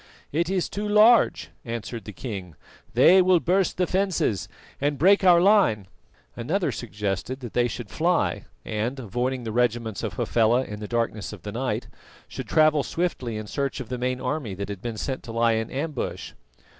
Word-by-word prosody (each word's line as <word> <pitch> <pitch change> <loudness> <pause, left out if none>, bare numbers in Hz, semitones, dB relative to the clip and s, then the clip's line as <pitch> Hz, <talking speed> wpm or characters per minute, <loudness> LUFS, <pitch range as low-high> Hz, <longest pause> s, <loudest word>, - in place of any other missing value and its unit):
"It 170 +3 0
is 190 -2 0
too 210 +1 -4
large," 215 +3 +5
answered 115 0 -6
the 105 - -7
king, 95 - -7 0.4
"they 175 +10 +7
will 180 -1 +4
burst 185 +3 +1
the 180 - +2
fences 185 - 0 0.3
and 145 +1 0
break 190 +8 +5
our 175 -2 +7
line." 185 - +4 0.5
Another 160 - -1
suggested 105 +2 -4
that 120 -3 -7
they 120 0 +2
should 115 -2 -7
fly 175 +2 0 0.2
and, 110 +5 -2
avoiding 125 +3 -2
the 110 - -4
regiments 115 -3 0
of - - -3
Hafela 120 +2 +2
in 105 -4 -7
the 105 - -6
darkness 115 -4 -2
of 95 -5 -11
the 105 - -5
night, 125 +4 -2 0.4
should - - -7
travel 155 -1 +4
swiftly 135 -10 -2
in 110 - -5
search 140 +7 -3
of 130 - -7
the 125 -1 -4
main 125 0 -1
army 130 -6 -3
that 100 +2 -5
had 100 -2 -6
been 115 -1 -5
sent 130 +4 -3
to 115 - -9
lie 115 0 +2
in 110 0 -1
ambush. 145 0 -4
125 Hz, 180 wpm, -25 LUFS, 110-165 Hz, 0.5 s, they